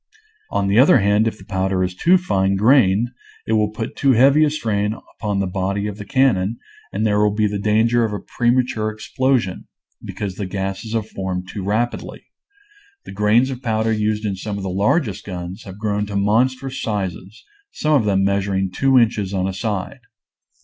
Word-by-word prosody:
On 100 - 0
the 100 +4 +3
other 130 0 +7
hand, 105 +1 +2
if 110 - -3
the - - -15
powder 95 -2 0
is 90 0 -2
too 175 - +4
fine 95 - 0
grained 110 0 +4 0.4
it 110 - -1
will 105 -1 +2
put 110 +1 -6
too 135 -2 +3
heavy 135 +6 +5
a 150 - +3
strain 110 -7 -1 0.2
upon 105 -3 -1
the 100 - 0
body 95 +2 -2
of 105 -1 -4
the 105 - -7
cannon 115 -6 +1 0.3
and - - -1
there 105 -1 +2
will 105 0 +4
be 105 0 +2
danger 110 +3 +2
of 110 - -1
a 105 - -3
prema 120 +4 +1
ture 110 -3 -3
explosion, 115 -1 -1 0.4
because 100 -3 -5
the 100 - -3
gases 95 +3 -4
have 110 -2 -1
formed 95 -3 -5
too 95 +1 -6
rapidly. 110 +5 -2 0.8
The - - -9
grains 105 +6 +2
of 130 -1 -6
powder 110 -2 0
used 105 0 -1
in 100 -2 -1
some 100 +2 -5
of 100 - -5
the 95 - -3
largest 105 - 0
guns 90 +3 -7
have 95 -1 -9
grown 105 -1 -1
to 100 - -6
mon 105 +5 +3
strous 130 +1 -7
sizes; 100 -1 -4 0.3
some 155 - -1
of 130 -7 +3
them 95 -1 +2
measuring 95 -1 0
two 135 +6 +2
inches 105 -5 +1
on 95 0 0
a 95 - -3
side. 100 0 -3
105 Hz, 195 wpm, -20 LUFS, 95-115 Hz, 0.8 s, other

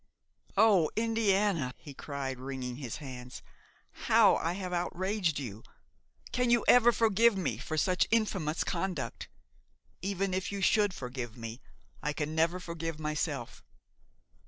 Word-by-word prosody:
"O 200 -7 +5
Indiana!" 205 - +1
he 145 - -11
cried, 135 -2 -5
wringing 130 -2 -5
his 130 -5 -5
hands, 125 -4 -8 0.6
"how - - +6
I 165 - -1
have 185 -1 -5
outraged 180 -1 -1
you! 110 -6 -6 0.7
Can 250 -1 +1
you 235 -1 +3
ever 240 -1 +7
forgive 225 -1 +3
me 135 - -2
for 155 +3 -4
such 180 +4 +2
infamous 195 -8 +1
conduct? 180 -3 -3 0.7
Even 195 0 -1
if 185 +2 -2
you 200 - -3
should 205 0 +3
forgive 125 -2 -6
me, 115 +1 -7 0.4
I 150 - -1
can 150 0 -3
never 165 +3 +2
forgive 165 -3 -5
myself. 150 -4 -3
170 Hz, 135 wpm, -31 LUFS, 135-195 Hz, 0.7 s, ever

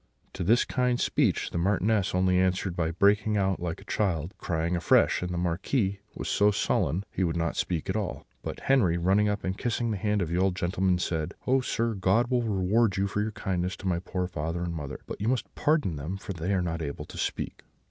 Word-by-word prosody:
"To - - -3
this 115 +7 +4
kind 125 -1 +1
speech - - +1
the - - -1
Marchioness 100 +1 +1
only 90 0 +3
answered 95 0 +1
by 80 -2 0
breaking 105 +4 +3
out 95 -1 +1
like 85 -1 -3
a - - -13
child, 95 -5 -1
crying 85 0 -1
afresh; 85 - +3
and 90 0 -3
the 90 - -2
Marquis 95 +4 0 0.2
was - - -5
so 105 +1 +4
sullen 95 -3 +1
that - - -14
he 95 - -1
would 85 -1 0
not 85 0 -1
speak 85 -4 -1
at - - -1
all; - - -3 0.2
but - - -6
Henri, 105 -11 +3
running 95 +4 +3
up 105 0 -2
and 95 +1 -3
kissing 115 -1 -1
the 105 - -1
hand 105 -1 +1
of 80 - -4
the 85 +2 0
old 95 -1 +2
gentleman, 95 0 +1
said: 80 -3 -2
"'Oh, 130 +1 +3
sir, 115 -2 -1
God 105 +5 +2
will 125 -1 +3
reward 105 -1 +2
you 95 - +2
for 100 +1 -1
your 110 +1 -1
kindness 90 0 -2
to 95 - -5
my 85 -2 +1
poor 90 0 -3
father 85 0 -3
and 85 -1 -3
mother: 75 -4 -5 0.2
you 105 - -2
must 115 -5 -1
pardon 145 - +1
them 80 +7 -4
if - - -16
they 85 +3 -2
are 95 -2 +2
not 85 -1 -2
able 70 -2 -4
to - - -11
speak.' - - -3
95 Hz, 230 wpm, -28 LUFS, 85-105 Hz, 0.2 s, this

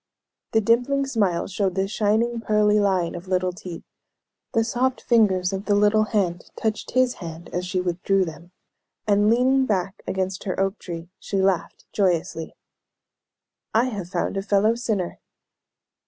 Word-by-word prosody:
The 220 - +4
dimpling 245 +6 +2
smile 205 -10 0
showed 190 -1 -1
the 190 0 +1
shining 220 +3 +1
pearly 210 -1 +3
line 190 -4 +1
of 175 +2 -8
little 185 -1 +1
teeth; 180 -3 -8 0.7
the 225 - +2
soft 250 +2 0
fingers 195 -6 +3
of 195 +2 -4
the 205 - +2
little 210 +1 +4
hand 190 -5 -1
touched 220 -1 -3
his 255 -1 +4
hand 165 0 -8
as 180 +1 -2
she 185 0 -1
withdrew 185 +2 +1
them; 170 +1 -10 0.5
and, 205 0 +3
leaning 260 +3 +3
back 195 -2 -1
against 190 0 -2
her 185 -2 -2
oak 195 +2 0
tree, 170 0 -7
she 195 - -2
laughed 190 -3 0
joyously: 170 -4 0 1.2
"I 240 +3 +3
have 200 -7 -5
found 195 - -2
a - - 0
fellow 205 +2 +3
sinner." 220 -7 -2
195 Hz, 155 wpm, -24 LUFS, 180-220 Hz, 1.2 s, The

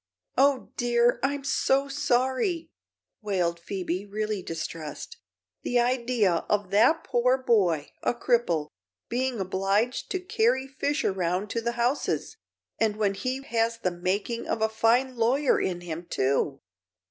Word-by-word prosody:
"Oh, 275 -1 +2
dear; 240 0 +3
I'm 280 +1 -1
so 275 0 +2
sorry," 265 +5 0 0.5
wailed 180 -5 0
Phoebe, 185 0 -3
really 210 0 -3
distressed. 165 -2 -6 0.4
"The 245 - +1
idea 240 -7 +1
of 205 -3 0
that 235 +11 +4
poor 250 +2 +2
boy 190 - +1
a - - 0
cripple 230 - +1 0.4
being 250 -1 -1
obliged 195 +5 0
to 375 - -1
carry 260 -7 +1
fish 275 +2 -2
around 185 +1 -1
to 230 - -1
the 235 +1 -1
houses; 240 +4 -1 0.4
and 220 -2 +2
when 210 -2 +1
he 255 +6 -3
has 230 -2 0
the 185 -6 -1
making 195 +7 -2
of - - -1
a 220 - +3
fine 240 +4 +2
lawyer 255 +5 +2
in 175 -2 -2
him, 170 0 -6
too!" 135 +1 0
230 Hz, 135 wpm, -27 LUFS, 190-255 Hz, 0.5 s, that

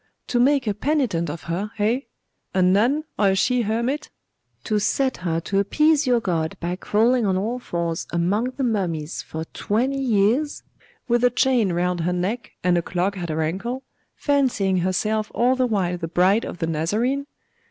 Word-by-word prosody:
'To 245 - 0
make 270 +1 +3
a 210 - 0
penitent 215 - 0
of 155 +2 -6
her, 180 +5 -3
eh? 220 +4 +2 0.6
a 185 - +3
nun, 225 +12 +3 0.2
or 200 - +4
a 190 - +2
she 250 +6 +2
hermit; 235 +6 -1 0.5
to 215 -2 0
set 260 +6 0
her 165 -2 -1
to 195 +4 -1
appease 300 +8 +3
your 245 -1 +4
God 165 -6 -2
by 175 +1 -2
crawling 230 +6 +2
on 190 -3 +1
all 225 +6 -2
fours 170 -7 -3
among 180 +7 +1
the 275 - -1
mummies 175 -9 -1
for 160 0 -6
twenty 255 +6 0
years, 240 +5 +1 0.4
with 240 0 +2
a 245 - +6
chain 245 -5 +2
round 175 +1 0
her 175 +2 0
neck 195 +7 -3
and 175 -1 +3
a - - -1
clog 180 +4 -1
at 175 -3 -5
her 160 0 0
ankle, 235 +11 -3 0.3
fancying 250 -10 +1
herself 210 +4 0
all 245 +3 +3
the 255 -1 +1
while 180 -6 0
the 165 - -3
bride 185 +6 +3
of - - -6
the 165 - -1
Nazarene? 215 - -1
205 Hz, 180 wpm, -23 LUFS, 180-245 Hz, 0.6 s, a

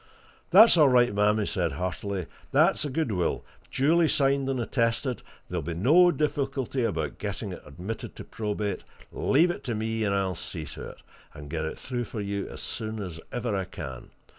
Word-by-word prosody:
"That's 210 +1 +8
all 150 -4 +7
right, 125 -2 +4
ma'am!" 105 +1 +3
he 105 - 0
said 85 -7 -1
heartily. 90 +3 -3 0.3
"That's - - +4
a 145 - -2
good 140 -2 -1
will, 90 -3 -1 0.2
duly 160 +5 +3
signed 140 -2 +2
and 130 -2 -1
attested, 120 +2 0
and - - -20 0.2
there'll - - -3
be 85 +3 -4
no 155 - +6
difficulty 140 -5 -1
about 115 - -2
getting - - -4
it - - -9
admitted 100 +6 -6
to - - -8
probate; 105 -1 -3 0.3
leave 165 +6 +3
it - - -7
to 120 -4 -2
me, 110 +1 -1
and 100 -2 +1
I'll 95 -1 0
see 80 -1 -4
to - - -8
it, - - -14 0.3
and 75 -1 -9
get 80 -1 -2
it 80 - -5
through 120 -2 -3
for 110 - -6
you 100 -1 -3
as - - -8
soon 110 0 -4
as 90 -5 -6
ever 120 -3 -2
I 95 -1 -1
can. 65 -7 -8
110 Hz, 195 wpm, -27 LUFS, 95-135 Hz, 0.3 s, That's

